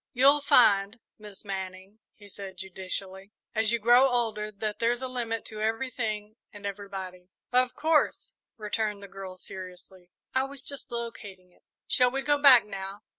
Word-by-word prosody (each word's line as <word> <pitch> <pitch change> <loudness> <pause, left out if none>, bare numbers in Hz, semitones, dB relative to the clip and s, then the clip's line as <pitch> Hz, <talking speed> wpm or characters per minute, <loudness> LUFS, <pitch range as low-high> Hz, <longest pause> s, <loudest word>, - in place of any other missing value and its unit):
"You'll 280 +3 +5
find, 215 -5 +4 0.2
Miss 210 -1 -11
Manning," 190 +1 -6 0.2
he 205 - -15
said 195 -1 -9
judicially, 190 +1 -5 0.2
"as 220 0 +2
you 235 - +3
grow 240 +4 +5
older, 220 -4 -1
that 210 +1 -4
there's 240 +2 +1
a - - -1
limit 235 -3 -3
to 215 -1 -7
everything 220 -2 -2
and 205 -1 -11
everybody." 190 -2 -6 0.2
"Of 250 0 +2
course," 315 -1 +1 0.2
returned 210 -1 -2
the - - -8
girl, 195 -1 -9
seriously; 185 -1 -11 0.2
"I 260 0 +2
was 275 -1 -5
just 280 -3 -7
locating 210 -6 -7
it." - - -28 0.3
"Shall 250 -1 +4
we 270 +2 -3
go 290 0 +2
back, 260 -6 +8
now?" 195 0 -7
215 Hz, 160 wpm, -28 LUFS, 195-245 Hz, 0.3 s, back